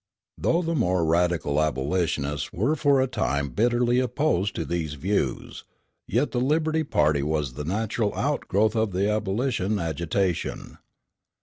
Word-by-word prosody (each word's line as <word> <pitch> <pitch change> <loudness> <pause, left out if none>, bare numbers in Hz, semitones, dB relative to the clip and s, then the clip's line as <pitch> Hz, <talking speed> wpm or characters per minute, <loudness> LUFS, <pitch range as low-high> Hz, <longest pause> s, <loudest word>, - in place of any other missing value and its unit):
Though 170 +2 +1
the 165 0 -1
more 90 - +1
radical 80 -3 +1
abolitionists 75 0 -1
were 125 - 0
for 145 -3 +3
a 130 - +3
time 70 - -1
bitterly 120 - +2
opposed 125 - 0
to 80 - -2
these 80 -4 -3
views, 75 -3 -2 0.4
yet 125 +7 0
the 120 - -1
Liberty 155 +3 +1
party 75 - +2
was 75 -3 -1
the 75 +3 -6
natural 105 +3 -1
outgrowth 105 +3 0
of 110 -3 0
the 95 +2 +1
abolition 105 0 0
agitation. 85 +2 -2
95 Hz, 135 wpm, -25 LUFS, 80-120 Hz, 0.4 s, for